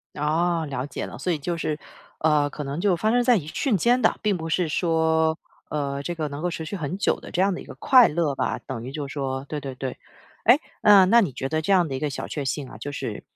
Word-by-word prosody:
哦， 160 +2 0
了 135 -1 -3
解 145 - -5
了， - - -9
所 180 - -1
以 160 - -1
就 170 +4 -3
是， 155 -2 -2 0.4
呃， 150 -2 +2
可 150 - -6
能 140 +4 -4
就 190 -2 +2
发 215 +6 +1
生 245 0 +3
在 245 -1 +4
一 160 -8 -3
瞬 220 - 0
间 245 +7 +2
的， - - +3
并 210 -3 +1
不 165 -1 -5
是 165 +1 +1
说， 160 0 +1 0.3
呃， 140 -2 -2
这 175 +4 -3
个 155 -2 -2
能 145 +1 -7
够 180 - 0
持 165 -1 -5
续 160 - -6
很 170 +2 -4
久 200 - +1
的 - - -10
这 180 - -1
样 195 0 +3
的 - - -6
一 - - -11
个 - - -10
快 255 -3 +6
乐 155 -3 0
吧， - - -1
等 125 -4 -7
于 130 - -6
就 145 0 -4
是 - - -9
说 135 -2 -3
对 150 - -4
对 135 -2 -6
对。 130 -1 -4 0.5
哎， 240 +5 +7 0.2
呃， 205 -2 +8
那 235 +5 +6
你 190 - 0
觉 135 - -4
得 155 +2 -1
这 200 - +1
样 180 -3 +4
的 135 - -5
一 130 - -3
个 150 - -1
小 135 - -5
确 145 - -4
幸 135 0 -3
啊， - - -10
就 140 +6 -5
是， 145 - -5
160 Hz, 295 characters per minute, -24 LUFS, 145-180 Hz, 0.5 s, 呃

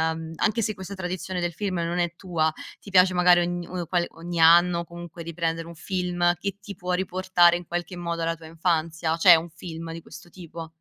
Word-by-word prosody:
mhmm, 160 0 -7
anche 225 +1 +1
se 215 0 -1
questa 190 0 -8
tradizione 185 0 -4
del 175 0 -1
film 195 +1 -3
non 170 +1 -2
è 175 -1 -1
tua, 170 -4 0 0.3
ti 200 - -12
piace 185 -1 +5
magari 180 0 +5
ogn 175 0 -3
uhm, 180 -2 -4
qual 175 -2 +1
ogni 170 +1 -5
anno 170 +1 +5
comunque 170 0 -10
riprendere 165 0 -3
un 170 - -10
film 175 -1 0
che 200 +1 -4
ti 200 -1 -8
può 180 0 -3
riportare 180 -1 +3
in 175 - -11
qualche 175 +1 -4
modo 170 -1 -3
alla 165 0 0
tua 160 -1 -14
infanzia? 165 0 -1
C'è 175 0 +8
un 165 +1 -2
film 165 0 -8
di 165 0 -7
questo 175 - -13
tipo? 165 -2 -9
175 Hz, 210 wpm, -25 LUFS, 165-180 Hz, 0.3 s, C'è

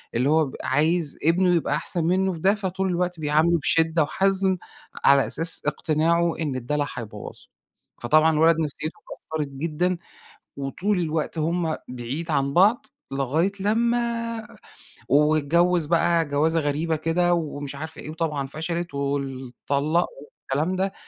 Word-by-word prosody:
اللي 125 +4 +2
هو 155 -3 +2
عايز 155 +2 +1
ابنه 180 +3 +3
يبقى 165 - 0
أحسن 180 -5 0
منّه 190 +2 +1
فده 190 +5 +2
فطول 190 -1 -2
الوقت 180 -1 -1
بيعامله 155 +3 +2
بشِدّة 160 +1 +3
وحَزم 190 +3 +2 0.5
على 140 -1 +6
أساس 165 +1 0
اقتناعه 165 +2 +1
إن 150 -5 -2
الدَلَع 145 +4 -1
حيبوّظه. 105 -6 -8 0.5
فطبعًا 155 +6 +4
الولد 160 +1 +4
نفسيته 155 0 -3 0.2
اتكسرت 155 -2 -4
جدًا 170 +5 -1 0.6
وطول 180 +9 -1
الوقت 160 -1 -2
هم 165 0 0
بعيد 125 +7 -5
عن 140 -2 0
بعض، 200 - +4 0.3
لغاية 140 +7 0
لمّا 230 +1 0 0.6
واتجوّز 155 +4 +3
بقى 170 +1 +2
جَوازة 155 +3 +1
غريبة 155 +2 -1
كده 165 +3 +1
ومش 145 -4 -3
عارف 160 +2 -7
إيه، - - -8
وطبعًا 155 -4 -2
فشلت 170 +3 -4
وال 140 -2 -3
طلَّق 150 +5 +2 0.2
والكلام 150 +3 -3
ده. 190 +1 -1
160 Hz, 130 wpm, -24 LUFS, 145-175 Hz, 0.6 s, على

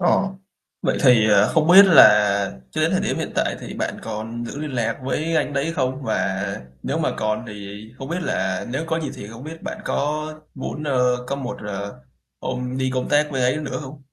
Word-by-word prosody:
Ờ, 175 - +3 0.6
vậy - - +1
thì, 120 -5 +6
ờ, 105 +1 +5
không 160 -1 +3
biết 195 +3 +10
là 100 - +6
cho - - -3
đến - - +3
thời - - +1
điểm - - -1
hiện - - -3
tại - - 0
thì - - -7
bạn - - -3
còn 115 +2 -5
giữ 140 - -6
liên 150 -1 -4
lạc 115 0 -1
với 155 +5 -1
anh 145 -1 0
đấy 140 +4 -1
không? 130 -3 -1
Và - - 0 0.7
nếu - - -2
mà - - +1
còn 110 +2 -1
thì 105 -1 -8 0.2
không 135 - -6
biết 175 +2 -2
là 95 - -1
nếu 140 +6 -2
có 165 0 -1
gì 150 - -3
thì 100 - -8
không 115 +4 -10
biết 160 +1 -9
bạn - - -5
có 150 +2 -1 0.3
muốn, 145 +2 -5
ơ, 125 -3 +1
có 140 - -2
một, 130 -2 -5
ờ, 100 -6 -6 0.4
hôm 125 0 -3
đi 130 0 0
công 130 - -1
tác 150 +1 +3
bên 130 -2 0
ấy 125 +4 +2
nữa 150 -3 -4
hông? 140 0 -10
130 Hz, 220 wpm, -22 LUFS, 110-150 Hz, 0.7 s, biết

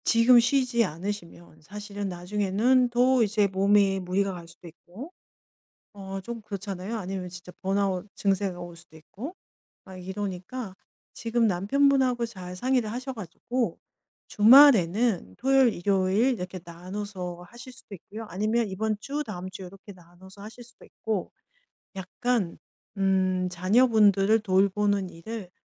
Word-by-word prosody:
지금 235 +1 +6
쉬지 245 -1 +2
않으시면 175 -2 -6
사실은 205 +3 -6
나중에는 210 +7 +1
더 250 +1 +3
이제 210 -1 +2
몸에 195 0 +3
무리가 190 +2 -1
갈 170 -2 -10
수도 170 +1 -15
있고. 185 - -12 0.9
어 195 0 -6
좀 230 +3 -7
그렇잖아요. 200 0 -5
아니면 190 -2 -5
진짜 180 0 -11
번아웃 195 0 -1
증세가 195 -2 -1
올 175 -1 -8
수도 170 -1 -18
있고. 230 - -9 0.5
막 190 -1 -11
이러니까 190 +3 -6 0.4
지금 230 0 0
남편분하고 250 +5 +2
잘 185 -5 -9
상의를 245 +1 0
하셔 255 +3 -5
가지고 230 +4 -4 0.5
주말에는 220 - +5
토요일 270 -3 +3
일요일 195 +6 +1
이렇게 185 -4 -6
나눠서 180 0 -7
하실 240 +2 -12
수도 250 -5 -12
있고요. 215 +5 -10
아니면 215 +5 0
이번 215 +2 -2
주 285 +6 -4
다음 185 -7 -7
주 190 +1 -10
요렇게 195 +2 -12
나눠서 185 +2 -17
하실 220 +4 -10
수도 245 - -20
있고 215 -5 -4 0.7
약간 190 +1 -2 0.4
음 185 -1 +1
자녀분들을 210 +1 +4
돌보는 200 -1 +1
일을 190 +3 -8
200 Hz, 300 characters per minute, -26 LUFS, 185-230 Hz, 0.9 s, 지금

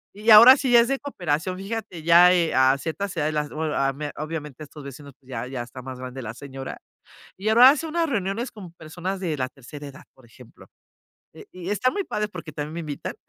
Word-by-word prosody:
y 210 +3 -2
ahora 230 +5 +10
sí, 265 -2 -1
ya 235 -1 +8
es 235 - 0
de 275 0 -1
cooperación. 180 - -3
Fíjate 195 -4 -6
ya, 170 +2 +7
eh, 170 -2 +1
a 130 +1 +4
ciertas 180 +7 -5
edades, 155 0 0
las 150 -1 -2
bue 155 0 -3
ah, 135 0 +1
me 145 +1 -6
obviamente, 155 -3 -6
estos 150 0 -12
vecinos, 140 +1 -11
pues, 130 - -28
ya 125 -1 -5
ya 130 -1 -5
está 125 +2 -11
más 130 0 -8
grande 130 +1 -7
la 110 -3 -6
señora, 135 0 -8 0.6
y 195 - -5
ahora 240 +4 +8
hace 305 +3 0
unas 330 +1 -1
reuniones 220 +1 -2
con 200 -6 -11
personas 175 +4 -6
de 160 -5 -2
la 130 - -1
tercera 145 +2 -11
edad, 140 0 -12
por 130 - -21
ejemplo, 120 0 -17 0.7
eh, - - -13
y 180 +1 -7
está 230 +5 +1
muy 395 +9 -3
padre, 210 -8 -3
porque 170 -5 -9
también 150 +2 -6
me 170 - -4
invitan, 150 -3 -6
160 Hz, 225 wpm, -24 LUFS, 140-205 Hz, 0.7 s, ahora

